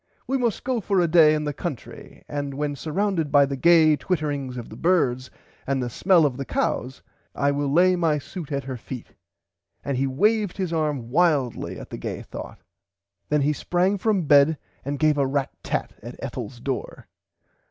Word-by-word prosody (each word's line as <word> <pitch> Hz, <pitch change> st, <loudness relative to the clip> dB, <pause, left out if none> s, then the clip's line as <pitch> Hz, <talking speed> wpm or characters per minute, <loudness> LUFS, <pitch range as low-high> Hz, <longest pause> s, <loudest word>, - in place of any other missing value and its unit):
We 265 Hz, -, -1 dB
must 240 Hz, -5 st, 0 dB
go 250 Hz, -2 st, -1 dB
for 195 Hz, 0 st, +1 dB
a 175 Hz, -, +3 dB
day 160 Hz, -2 st, +6 dB
in 150 Hz, -, -2 dB
the 150 Hz, -1 st, -2 dB
country 145 Hz, -4 st, -7 dB
and 145 Hz, -1 st, -4 dB
when 145 Hz, 0 st, -2 dB
surrounded 165 Hz, 0 st, -1 dB
by 140 Hz, -1 st, +6 dB
the 140 Hz, 0 st, -3 dB
gay 160 Hz, +1 st, +5 dB
twittering 145 Hz, -7 st, -2 dB
of 120 Hz, -, -7 dB
the -, -, -10 dB
birds 130 Hz, -6 st, +1 dB, 0.4 s
and 135 Hz, 0 st, 0 dB
the 120 Hz, -1 st, -3 dB
smell 175 Hz, -, +4 dB
of 130 Hz, -4 st, -1 dB
the 140 Hz, -, -3 dB
cows 130 Hz, +1 st, -2 dB, 0.3 s
I 140 Hz, 0 st, +2 dB
will 140 Hz, -1 st, -1 dB
lay 180 Hz, +4 st, +5 dB
my 165 Hz, -4 st, +1 dB
suit 150 Hz, +1 st, -8 dB
at 140 Hz, -1 st, -2 dB
her 130 Hz, -1 st, -5 dB
feet 125 Hz, +1 st, -8 dB, 0.8 s
and 140 Hz, -2 st, -1 dB
he 135 Hz, +1 st, +1 dB
waved 205 Hz, +8 st, +1 dB
his 185 Hz, -4 st, -2 dB
arm 150 Hz, -7 st, -1 dB
wildly 150 Hz, -6 st, +1 dB
at -, -, -11 dB
the -, -, -6 dB
gay -, -, -5 dB
thought. -, -, -9 dB, 0.7 s
Then 150 Hz, -1 st, +2 dB
he 150 Hz, +2 st, +2 dB
sprang 180 Hz, +6 st, 0 dB
from 205 Hz, -3 st, +1 dB
bed 145 Hz, +1 st, +5 dB, 0.3 s
and 140 Hz, +1 st, -3 dB
gave 150 Hz, 0 st, +2 dB
a 140 Hz, -, +2 dB
rat 135 Hz, 0 st, -1 dB
tat -, -, -3 dB
at 120 Hz, +3 st, -9 dB
Ethels 125 Hz, -2 st, -6 dB
door. 130 Hz, +1 st, -5 dB
150 Hz, 190 wpm, -24 LUFS, 135-175 Hz, 0.8 s, day